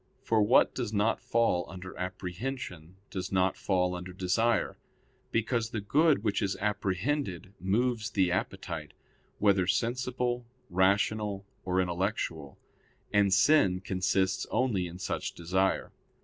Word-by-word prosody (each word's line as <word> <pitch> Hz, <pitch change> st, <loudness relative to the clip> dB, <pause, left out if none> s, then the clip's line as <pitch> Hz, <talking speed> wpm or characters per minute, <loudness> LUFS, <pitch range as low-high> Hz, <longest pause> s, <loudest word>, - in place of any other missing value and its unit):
For 110 Hz, -1 st, +2 dB
what 105 Hz, +5 st, +5 dB
does 120 Hz, -5 st, -3 dB
not 110 Hz, +1 st, +1 dB
fall 115 Hz, -7 st, +2 dB
under 95 Hz, 0 st, -8 dB
apprehension, 90 Hz, -1 st, -5 dB, 0.2 s
does 95 Hz, -1 st, -4 dB
not 95 Hz, 0 st, +2 dB
fall 90 Hz, -2 st, +1 dB
under 90 Hz, +1 st, -6 dB
desire; 100 Hz, +5 st, +1 dB, 0.5 s
because 115 Hz, 0 st, 0 dB
the 110 Hz, -, -3 dB
good 145 Hz, +4 st, +3 dB
which 105 Hz, -1 st, 0 dB
is 100 Hz, -2 st, 0 dB
apprehended 100 Hz, -, -1 dB
moves 110 Hz, +4 st, 0 dB
the 95 Hz, -3 st, +2 dB
appetite, 90 Hz, -5 st, -3 dB, 0.4 s
whether 100 Hz, -3 st, +3 dB
sensible, 125 Hz, +2 st, 0 dB, 0.3 s
rational, 100 Hz, +2 st, +1 dB, 0.2 s
or 90 Hz, 0 st, +1 dB
intellectual; 90 Hz, -5 st, -2 dB, 0.6 s
and 100 Hz, -1 st, +4 dB
sin 95 Hz, -2 st, +4 dB
consists 95 Hz, 0 st, 0 dB
only 110 Hz, -7 st, +1 dB
in 85 Hz, +1 st, -9 dB
such 95 Hz, -, -3 dB
desire. 95 Hz, +3 st, 0 dB
95 Hz, 120 wpm, -30 LUFS, 90-115 Hz, 0.6 s, what